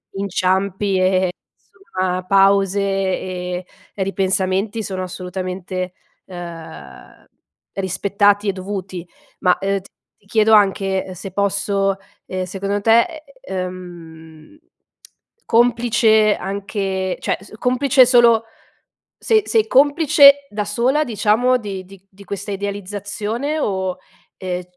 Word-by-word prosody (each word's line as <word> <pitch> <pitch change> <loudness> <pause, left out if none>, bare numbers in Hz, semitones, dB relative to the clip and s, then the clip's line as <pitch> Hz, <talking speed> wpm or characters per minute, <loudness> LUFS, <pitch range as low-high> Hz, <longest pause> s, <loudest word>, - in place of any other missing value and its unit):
inciampi 195 0 0
e - - +1
e 185 0 +2
e, - - -3 0.6
somma, 185 -1 -1
pause 195 0 +3
e 185 -2 -2 0.3
ripensamenti 195 +2 -1
sono 190 -2 -4
assolutamente, 185 0 -5 0.3
ehm, 170 -3 -11 0.5
rispettati 200 +2 +1
e - - +3
dovuti. 185 -2 -6 0.3
Ma, 180 -2 +3
uhm, 195 0 0
t - - -25 0.3
ti - - -33
chiedo 220 +1 +3
anche, 195 -2 +3
uhm, 185 - -7
se 190 +2 -8
posso, 200 0 0 0.3
ehm, 185 0 -4
secondo 195 +2 -3
te, 235 - +3 0.2
ehm, 175 - -8 0.9
complice 230 -2 +3
anche 195 -1 -3
cioè, - - -1
s 195 - -15
complice 255 +1 +4
solo 235 -2 +5 0.8
sei 435 -1 +2
sei 445 -1 +2
complice 285 -1 +6
da 210 0 -3
sola, 245 +9 +1
diciamo, 230 +2 +2
di 195 -4 -6
di 195 0 -16
di 200 +1 -16
questa 200 +2 -6
idealizzazione? 205 +7 -4
O, 190 -5 -2 0.4
ehm, 180 -1 -3
195 Hz, 110 wpm, -19 LUFS, 185-215 Hz, 0.9 s, complice